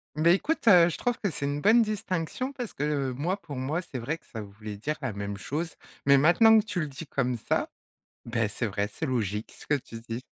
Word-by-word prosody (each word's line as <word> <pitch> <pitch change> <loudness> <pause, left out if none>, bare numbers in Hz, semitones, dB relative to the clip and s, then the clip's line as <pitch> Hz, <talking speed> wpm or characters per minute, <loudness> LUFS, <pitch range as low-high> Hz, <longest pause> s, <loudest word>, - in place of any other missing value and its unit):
Mais 170 +4 +5
écoute, 300 +2 -2
heu, 175 -4 +8
je - - -4
trouve 245 -1 0
que 200 -5 -1
c'est 140 - -3
une 145 +1 -1
bonne 225 +6 +6
distinction 215 - -2
parce 245 -5 -6
que, - - -3
heu, 140 -3 0
moi 165 +9 -1
pour 150 -8 -9
moi 140 +7 -1
c'est 140 - -7
vrai 145 +7 -3
que - - -31
ça 110 - -6
voulait 105 0 -8
dire 150 +8 -2
la 130 -4 -2
même 100 0 -4
chose. 155 - -3 0.3
Mais 140 0 +6
maintenant 215 +9 +7
que - - 0
tu 205 -4 -2
le 155 - -2
dis 140 +3 -9
comme 125 -3 0
ça, 115 - -1 0.6
beh, 115 -2 0
c'est 110 +3 -3
vrai, 100 +1 -1
c'est 160 - -3
logique 110 -4 -2
ce - - -13
que - - +1
tu 120 -5 -3
dis. 115 +2 -4
145 Hz, 245 wpm, -28 LUFS, 115-175 Hz, 0.6 s, heu